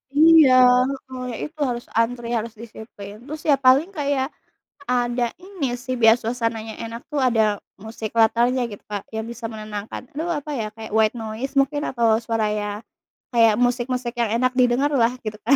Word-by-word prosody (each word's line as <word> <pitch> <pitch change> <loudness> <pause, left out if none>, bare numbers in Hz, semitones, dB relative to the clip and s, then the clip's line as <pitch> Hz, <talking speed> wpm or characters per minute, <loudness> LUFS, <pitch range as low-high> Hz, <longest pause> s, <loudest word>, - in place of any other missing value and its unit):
Iya, 315 -3 +7 0.6
heeh, 255 -1 -6
ya - - -5
itu 305 0 -12
harus 240 -1 -4
antri, 235 +1 0
harus 230 -1 -2
disiplin. 215 -2 -10
Terus 310 +1 -6
ya, 285 - +7
paling 270 +6 +4
kayak 285 -4 -1 0.6
ada 240 -1 +1
ini 355 -10 -4
sih 255 +1 -5
biar 225 0 +8
suasananya 230 -2 -3
enak 230 +1 -7
tuh 290 - -1
ada 220 -5 +2 0.2
musik 220 0 -6
latarnya 235 +3 +3
gitu, 205 - -9
Kak, 205 -2 -4
yang 220 0 -3
bisa 235 -1 -7
menenangkan. 215 -1 -6
Aduh, 320 +4 -3
apa 300 +1 -8
ya, 220 - -2
kayak 220 0 -9
white 220 -1 +3
noise 225 +4 -5
mungkin 290 +2 +1
atau 230 -3 +2
suara 225 -2 -1
ya, 210 -1 -2 0.6
kayak 230 -2 +5
musik-musik 245 0 0
yang 235 -2 +1
enak 255 0 +2
didengarlah, 250 0 +3
gitu 215 0 -4
kan. 275 +4 +5
240 Hz, 170 wpm, -22 LUFS, 220-260 Hz, 0.6 s, biar